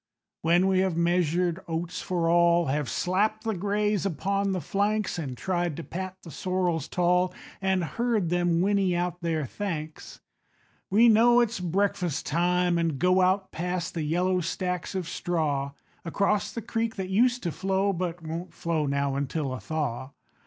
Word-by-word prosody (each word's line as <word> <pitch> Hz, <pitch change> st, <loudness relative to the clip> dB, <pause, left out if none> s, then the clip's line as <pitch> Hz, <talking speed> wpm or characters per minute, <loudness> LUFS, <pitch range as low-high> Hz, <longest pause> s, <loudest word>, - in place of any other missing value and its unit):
When 170 Hz, +3 st, +3 dB
we 190 Hz, -1 st, +3 dB
have 185 Hz, -3 st, +1 dB
measured 175 Hz, 0 st, +1 dB
oats 165 Hz, +1 st, -3 dB
for 175 Hz, -2 st, -1 dB
all, 170 Hz, 0 st, +4 dB
Have 145 Hz, -2 st, -1 dB
slapped 205 Hz, -, 0 dB
the 225 Hz, -1 st, -1 dB
grays 205 Hz, +1 st, 0 dB
upon 195 Hz, +2 st, 0 dB
the 185 Hz, -, -1 dB
flanks, 200 Hz, +4 st, -1 dB
An' 135 Hz, -5 st, -4 dB
tried 175 Hz, +1 st, -1 dB
to 170 Hz, -, -5 dB
pat 185 Hz, +2 st, -6 dB
the 165 Hz, -, -10 dB
sorrels 180 Hz, -3 st, -1 dB
tall, 180 Hz, +2 st, +2 dB, 0.3 s
An' 190 Hz, -2 st, +1 dB
heard 220 Hz, 0 st, 0 dB
them 175 Hz, -1 st, +2 dB
whinny 195 Hz, -2 st, +2 dB
out 175 Hz, 0 st, -2 dB
their 160 Hz, -3 st, -1 dB
thanks, 155 Hz, -, -5 dB, 0.7 s
We 220 Hz, +5 st, +5 dB
know 235 Hz, +2 st, +6 dB
it's 235 Hz, -3 st, +1 dB
breakfast 180 Hz, -3 st, -1 dB
time, 175 Hz, +2 st, +2 dB
and 165 Hz, -4 st, 0 dB
go 180 Hz, +4 st, +3 dB
Out 190 Hz, +1 st, +2 dB
past 180 Hz, +1 st, -3 dB
the 165 Hz, -, -3 dB
yellow 180 Hz, +4 st, +1 dB
stacks 180 Hz, +2 st, -3 dB
of 185 Hz, -3 st, -2 dB
straw, 145 Hz, -7 st, -1 dB, 0.3 s
Across 200 Hz, +4 st, 0 dB
the 230 Hz, -, -5 dB
creek 225 Hz, 0 st, -2 dB
that 190 Hz, -2 st, -4 dB
used 245 Hz, +5 st, +2 dB
to 170 Hz, -, -1 dB
flow, 195 Hz, +3 st, 0 dB
But 175 Hz, -1 st, -3 dB
won't 165 Hz, +3 st, -6 dB
flow 160 Hz, -3 st, -1 dB
now 140 Hz, 0 st, 0 dB
until 140 Hz, 0 st, -2 dB
a 130 Hz, -, -5 dB
thaw. 135 Hz, +1 st, -3 dB
180 Hz, 165 wpm, -27 LUFS, 165-195 Hz, 0.7 s, know